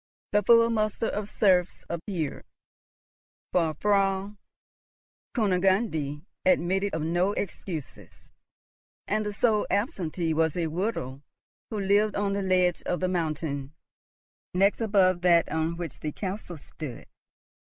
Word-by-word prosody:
The 210 - +3
full 230 +2 +5
muster 215 0 0
of 210 -1 -3
serfs 185 -5 +2
appeared, 170 -3 -4 1.1
for 165 -3 +1
Frau 195 +2 +1 1.0
Kunigunde 185 - +1 0.2
admitted 190 +1 +2
of 160 - -2
no 175 +5 +1
excuses, 175 -6 -6 0.8
and 215 +1 0
the 210 - -3
sole 215 0 +2
absentee 180 - -1
was 160 +1 +1
a 170 - 0
widow 160 - -3 0.5
who 215 - -3
lived 205 +2 +2
on 200 -1 0
the 200 - -1
ledge 185 -2 +2
of 180 - 0
the 185 - 0
mountain 155 -5 -2 0.8
next 195 +4 +3
above 190 -5 +3
that 170 -2 +4
on 160 +1 -1
which 170 -5 -6
the 155 - -3
castle 185 -1 -5
stood. 145 -3 -8
185 Hz, 120 wpm, -27 LUFS, 165-205 Hz, 1.1 s, full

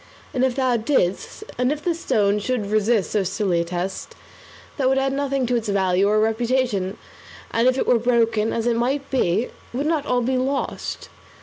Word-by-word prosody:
And 255 - 0
if 260 -2 +1
thou 255 -3 +2
didst, 220 - -1 0.2
and 250 +2 +2
if 300 0 -4
the 350 - +1
stone 210 -10 +1
should 230 0 -2
resist 215 -1 +2
so 210 - +1
silly 190 -2 0
a - - 0
test, 180 +2 -5 0.6
that 265 -3 +2
would 265 - +2
add 270 0 +1
nothing 275 -1 0
to 245 +1 0
its 230 -2 -2
value 190 0 +2
or 215 +1 +3
reputation; 225 -3 0 0.5
and 230 +2 +2
if 255 0 +3
it - - 0
were 245 - +3
broken, 230 -2 +2
as 230 - -2
it 240 -1 +2
might 270 +4 -1
be, 225 -3 +1 0.2
would 270 +4 -2
not 305 -2 0
all 245 -1 +1
be 260 +2 0
lost? 275 +2 -3
240 Hz, 195 wpm, -22 LUFS, 210-260 Hz, 0.6 s, or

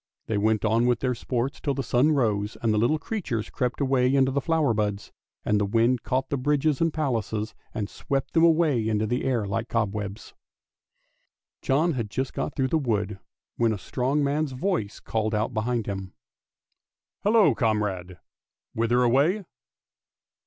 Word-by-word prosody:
They 105 -2 -1
went 110 +1 +1
on 115 +3 +3
with 120 -2 +1
their 130 -1 +1
sports 125 +3 -3
till 140 -2 -1
the 135 - -2
sun 130 +6 +3
rose, 105 -6 0
and 110 -2 +2
the 105 - +2
little 120 +8 +2
creatures 150 - -4
crept 125 -1 -2
away 135 -1 +2
into 135 -1 +3
the 140 +1 0
flower 160 -5 +2
buds, 105 -1 -2 0.3
and 105 0 +2
the - - +3
wind 115 +3 +2
caught 130 +1 -1
the 140 - 0
bridges 145 +2 +1
and 165 0 +3
palaces 115 -8 -2 0.2
and 105 -2 -3
swept 135 +4 -3
them 165 - +4
away 155 -9 +3
into 110 -1 +1
the 120 +3 -1
air 120 -5 0
like 105 +4 -3
cobwebs. 105 -2 -3 1.3
John 155 +6 +2
had 115 -5 -3
just 130 +5 -3
got - - -3
through 130 -1 0
the 160 - +2
wood, 105 -7 -1 0.4
when 115 -1 +2
a - - -3
strong 135 +8 -1
man's 145 0 0
voice 130 - -2
called 110 0 -1
out 105 +1 -1
behind 115 0 -1
him, 95 -2 -5 0.5
" - - -55
Hallo, 205 - +5
comrade! 105 -6 -1 0.6
whither 120 +2 +2
away? 145 - +2
120 Hz, 170 wpm, -26 LUFS, 110-140 Hz, 1.3 s, Hallo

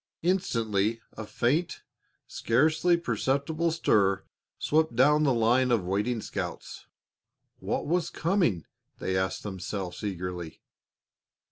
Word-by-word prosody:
Instantly 115 - 0 0.2
a 110 -1 -7
faint, 145 +11 0 0.4
scarcely 155 +8 +2
perceptible 160 0 0
stir 100 - +2 0.3
swept 155 -4 +1
down 150 +5 +5
the 145 -3 +3
lines 120 +2 +3
of 115 -6 +2
waiting 105 +5 -1
scouts. - - -6 0.7
What - - -2
was 170 +1 0
coming? 165 - 0 0.3
they 95 - -2
asked 95 0 -1
themselves 95 -2 -5
eagerly. 90 -4 -5
120 Hz, 105 wpm, -28 LUFS, 100-155 Hz, 0.7 s, down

